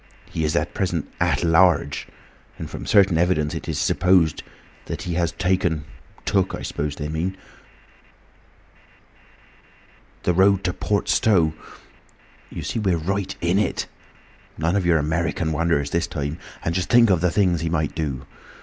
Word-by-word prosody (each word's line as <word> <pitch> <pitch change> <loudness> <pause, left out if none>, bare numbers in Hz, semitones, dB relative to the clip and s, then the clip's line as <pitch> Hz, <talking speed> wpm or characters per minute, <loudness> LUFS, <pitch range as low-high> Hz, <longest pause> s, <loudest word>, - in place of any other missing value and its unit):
He 80 - -2
is 75 0 0
at - - 0
present 90 -5 -1
At - - +1
Large, 85 -1 +3 0.5
and - - -6
from - - -8
certain 95 -5 +4
evidence 85 -4 +1
it - - -6
is - - -2
supposed 90 -4 +2 0.4
that - - -5
he 90 - -3
has—taken—took, 90 +2 -1
I - - -8
suppose 75 0 -3
they 75 - -4
mean—the 80 +5 -2 3.0
road 95 +2 +4
to 90 -1 0
Port 100 +2 -1
Stowe. 85 -8 +3 1.0
You - - -6
see - - -2
we're 95 -5 +1
right 95 +4 -2
in 85 +4 +2
it! 105 - -1 0.7
None 80 +4 0
of 95 -3 +1
your 85 -2 +4
American 80 +1 -1
wonders, 75 -3 0
this 85 - 0
time. 75 +1 -4 0.3
And 80 - 0
just 90 +1 -2
think 120 -3 +6
of 90 -3 +2
the 90 - +3
things 90 -3 +1
he 85 - -1
might 75 -3 -1
do! 70 -5 -3
85 Hz, 150 wpm, -23 LUFS, 80-95 Hz, 3.0 s, think